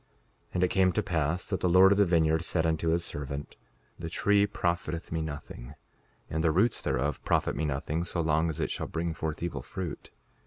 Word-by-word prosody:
5:35 - - -39 0.5
And 90 - +2
it - - +5
came 95 0 +3
to 105 - 0
pass 85 -1 -1
that 95 - -2
the 90 - +1
Lord 95 +2 +7
of 100 - +4
the 100 - +6
vineyard 80 -2 +2
said 85 -1 +1
unto 80 0 0
his 85 +1 +2
servant: 70 0 -5 0.4
The 80 -1 -5
tree 100 +4 +3
profiteth 85 -4 -2
me 80 0 -1
nothing, 75 -3 -7 0.5
and 80 0 -2
the 80 - +4
roots 100 +8 +2
thereof 65 +3 -1
profit - - +1
me 80 - -1
nothing 75 +3 -2
so 85 0 -2
long 80 0 +2
as 80 - -5
it - - -1
shall - - -3
bring 80 0 -2
forth 80 0 -4
evil 75 -7 -3
fruit. 85 +3 -6
80 Hz, 210 wpm, -29 LUFS, 75-90 Hz, 0.5 s, Lord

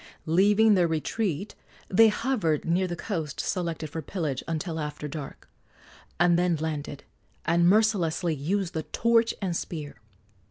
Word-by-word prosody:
Leaving 205 +6 +4
their 180 -3 +3
retreat, 180 +3 -2 0.3
they 225 +4 +6
hovered 210 - 0
near 180 +3 +1
the 175 - -4
coast 165 -6 -4
selected 170 -3 -2
for 160 +2 -5
pillage 155 -4 -3
until 160 0 -3
after 150 0 -4
dark, 145 -1 -8 0.7
and 175 0 +4
then 175 -1 +2
landed 150 -2 -4 0.4
and 170 +1 +4
mercilessly 185 -5 +2
used 175 +6 -2
the 160 - -1
torch 230 +9 +2
and 180 -3 -1
spear. 150 -6 -5
170 Hz, 135 wpm, -27 LUFS, 155-195 Hz, 0.7 s, they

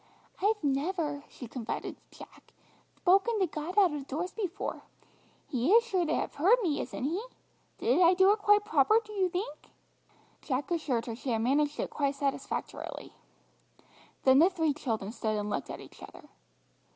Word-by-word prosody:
"I've 420 -1 +1
never," 295 +1 -1
she 245 - -9
confided 230 -1 -5
to - - -18
Jack, - - -15 0.5
"thpoken 395 +5 +4
to 380 - +3
God 320 +3 -6
out 375 -6 +5
of 285 -2 -5
doors 340 +7 -3
before. 405 -2 -4 0.7
He 255 +6 0
is 465 +1 +7
sure 375 -7 0
to 315 - +1
have - - -2
heard 380 +12 +4
me, 305 -6 0
isn't - - -6
He? 330 +9 -1 0.6
Did 260 +9 +2
I 350 +1 +6
do 380 +2 +6
it 430 - +1
quite 415 0 +4
proper, 320 +5 +4
do 425 - -10
you 380 -3 +1
think?" 355 -4 -5 0.7
Jack 275 +4 -3
assured 275 -9 0
her 230 - -5
she 260 +3 -6
had 225 -2 0
managed 290 +4 +1
it - - -2
quite 280 -1 0
satisfactorily. 275 -1 -4 1.1
Then 265 0 +6
the 340 +4 +6
three 320 -5 0
children 225 -8 -3
stood 220 -2 -2
and 210 0 -3
looked 140 - -3
at - - -6
each - - -15
other. - - -12
310 Hz, 175 wpm, -30 LUFS, 270-380 Hz, 1.1 s, is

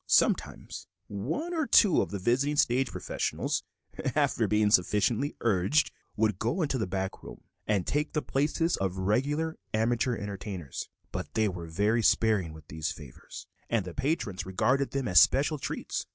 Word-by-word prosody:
Sometimes - - +1 0.2
one 155 - -3
or 315 -4 0
two 200 -7 +5
of - - -2
the 100 - -4
visiting 130 +9 +1
stage 130 -2 +2
professionals, - - -2 0.5
after - - +2
being 105 -1 +2
sufficiently 105 +7 +2
urged, 110 +7 +2 0.2
would 105 -3 +1
go 155 +11 0
into 140 -4 -1
the 110 - -1
back 95 +1 -3
room - - -11 0.2
and 100 -5 +1
take 150 +1 -1
the 150 - 0
places 155 +4 0
of 95 -2 -2
the 95 - -4
regular 145 +11 0 0.2
amateur 120 +2 +1
entertainers, 100 - -6 0.2
but - - -5
they 110 -1 +3
were 90 -4 -5
very 105 +8 +1
sparing 105 -7 +2
with 80 -1 -13
these 80 +3 -3
favors, 75 -5 -10 0.2
and 115 -5 +1
the 90 - -7
patrons 130 - -2
regarded 130 +9 +1
them 135 -2 -2
as 90 - +7
special 145 +3 +3
treats. - - -4
110 Hz, 165 wpm, -29 LUFS, 95-140 Hz, 0.5 s, as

